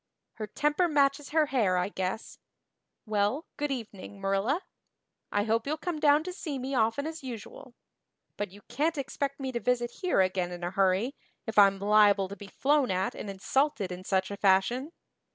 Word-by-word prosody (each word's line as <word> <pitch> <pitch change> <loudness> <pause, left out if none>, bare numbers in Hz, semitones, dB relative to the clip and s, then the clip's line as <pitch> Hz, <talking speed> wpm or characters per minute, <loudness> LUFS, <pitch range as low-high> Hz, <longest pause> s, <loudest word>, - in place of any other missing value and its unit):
Her 215 -2 -4
temper 295 - +1
matches 285 -2 +2
her 315 0 +3
hair 220 -10 +1
I 180 +2 0
guess. 190 +2 -4 0.7
Well, 215 +8 0
good 295 0 -2
evening, 210 -6 -6
Marilla. 195 - 0 0.7
I 205 - +1
hope 225 +3 0
you'll 305 +2 -1
come 325 0 -3
down 295 +1 +5
to 365 +1 -5
see 310 -7 -4
me 265 +1 -4
often 230 +3 +1
as 320 0 -5
usual. 245 0 -9 0.6
But 205 - -3
you 200 +2 -15
can't 315 +3 -1
expect 275 0 -3
me 265 -1 -3
to 240 - -2
visit 240 -1 0
here 365 - +2
again 185 -1 0
in 175 0 -7
a 175 - -2
hurry, 195 +6 +2 0.3
if 225 -3 +2
I'm 195 -1 +6
liable 205 -1 +4
to 200 - -6
be 205 -1 -11
flown 280 +6 +2
at 185 +1 0
and 205 - -7
insulted 205 +1 0
in 180 +1 -6
such 190 0 0
a 200 - -5
fashion. 205 - +2
225 Hz, 185 wpm, -29 LUFS, 195-280 Hz, 0.7 s, I'm